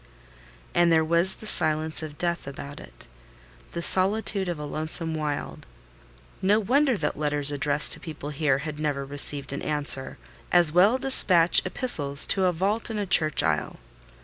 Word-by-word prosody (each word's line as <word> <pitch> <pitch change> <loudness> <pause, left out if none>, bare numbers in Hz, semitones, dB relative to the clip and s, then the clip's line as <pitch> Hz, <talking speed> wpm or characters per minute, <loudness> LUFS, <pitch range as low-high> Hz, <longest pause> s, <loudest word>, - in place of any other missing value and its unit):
And 175 -1 +2
there 160 -1 +2
was 170 +3 +3
the - - -13
silence 155 -5 +2
of 150 -2 -9
death 170 -4 -3
about 140 +1 -9
it: - - -15 0.7
the 170 - -4
solitude 195 0 +1
of 175 - -4
a 150 - -7
lonesome 160 +2 -3
wild. 150 -2 -5 0.7
No 205 +3 +2
wonder 260 +3 +1
that 150 -4 -4
letters 145 -1 0
addressed 145 +1 -1
to - - -6
people 155 -3 -9
here 145 -2 0
had 150 -1 -7
never 145 -2 -3
received 140 0 -2
an 140 - -6
answer: 145 -3 -2 0.3
as 175 -3 +4
well 195 +9 +3
despatch 185 -10 +5
epistles 150 - +1
to 190 -1 +2
a 180 - +2
vault 200 +7 -2
in 220 - -5
a 205 - -3
church 155 -5 +2
aisle. 75 -2 -2
160 Hz, 165 wpm, -24 LUFS, 145-185 Hz, 0.7 s, despatch